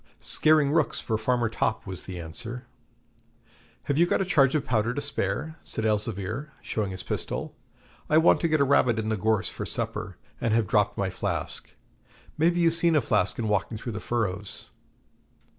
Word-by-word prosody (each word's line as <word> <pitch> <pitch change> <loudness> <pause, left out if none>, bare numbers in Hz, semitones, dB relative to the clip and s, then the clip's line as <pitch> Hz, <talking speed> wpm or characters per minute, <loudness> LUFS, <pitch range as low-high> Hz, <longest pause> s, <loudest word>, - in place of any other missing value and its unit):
'Scaring 155 -2 +4
rooks 155 -1 +1
for 110 - -2
Farmer 120 +2 +1
Topp,' 110 0 -1
was 95 -2 -6
the 90 -2 -6
answer. 115 +10 -6 1.2
'Have 140 +2 0
you 175 - +5
got - - +1
a 195 - +1
charge 140 -6 +3
of 150 - 0
powder 115 0 0
to - - -1
spare?' 150 +3 -2
said 110 - -3
Elzevir, 110 +5 -2
showing 105 -3 -2
his 95 -1 -6
pistol. - - -3 0.6
'I 155 - +5
want 160 - +5
to 170 - +2
get 155 -1 +2
a - - +5
rabbit 125 -4 +3
in 110 0 -1
the 110 - +1
gorse 105 -3 +1
for - - -5
supper, - - -3 0.2
and 115 -1 +2
have 115 -1 +2
dropped - - +1
my - - -1
flask. - - -4 0.6
Maybe 170 +3 +2
you've 165 -1 +4
seen 170 -1 +2
a - - +6
flask 100 -4 +1
in 115 - -2
walking 105 +1 0
through 120 +2 -5
the 105 - -4
furrows?' 105 -4 -3
115 Hz, 185 wpm, -27 LUFS, 105-150 Hz, 1.2 s, a